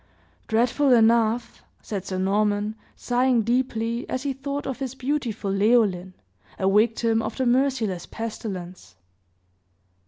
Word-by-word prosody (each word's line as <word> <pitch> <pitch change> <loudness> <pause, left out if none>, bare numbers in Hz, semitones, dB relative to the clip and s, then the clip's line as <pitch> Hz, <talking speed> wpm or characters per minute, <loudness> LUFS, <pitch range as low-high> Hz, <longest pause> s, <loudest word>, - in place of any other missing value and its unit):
"Dreadful 250 +5 +2
enough!" 230 0 +2 0.2
said 195 -3 -5
Sir 185 - -3
Norman, 205 +2 +1 0.2
sighing 245 -1 +1
deeply, 235 0 -1
as 255 - -2
he 280 -1 -1
thought 280 +2 -5
of 265 -1 -4
his 265 -2 -4
beautiful 250 -7 -2
Leoline, 195 -3 +2 0.4
a 190 - 0
victim 225 +2 +2
of 220 0 -5
the 260 - 0
merciless 240 -7 +1
pestilence. 195 -5 -7
230 Hz, 120 wpm, -24 LUFS, 205-255 Hz, 0.4 s, Dreadful